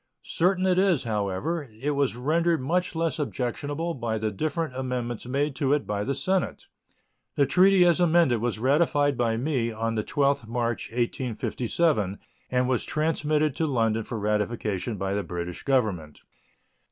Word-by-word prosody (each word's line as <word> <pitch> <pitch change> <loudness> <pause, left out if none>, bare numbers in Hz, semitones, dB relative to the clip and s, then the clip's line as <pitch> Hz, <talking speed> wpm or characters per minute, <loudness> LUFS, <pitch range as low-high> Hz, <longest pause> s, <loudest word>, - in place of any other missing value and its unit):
Certain 185 +2 +1
it 185 -1 +3
is, 185 -7 +3
however, 115 - -2
it 145 +5 -1
was 140 -4 0
rendered 165 +6 +1
much 175 +7 -1
less 165 -2 -1
objectionable 145 +4 -2
by 115 -5 -2
the 110 0 -1
different 155 - -2
amendments 125 -2 -3
made 140 +2 -1
to 140 0 +1
it 145 - 0
by 105 0 -2
the 140 +5 -1
Senate. 185 +6 -1 0.7
The 140 - +4
treaty 185 +3 +5
as 175 0 +4
amended 165 -9 +3
was 120 -2 -1
ratified 145 +3 +2
by 115 -2 0
me 125 -3 0
on 115 +1 -2
the 110 -1 -1
12th 140 -3 0
March, 120 0 -2
1857, 120 - -1 0.3
and 125 0 +1
was 130 -2 +1
transmitted 155 -2 0
to 160 - +1
London 115 -4 +1
for 115 - -5
ratification 105 0 -1
by 95 +1 -2
the 100 - 0
British 85 -1 -5
Government. 105 - -1
130 Hz, 155 wpm, -26 LUFS, 115-155 Hz, 0.7 s, treaty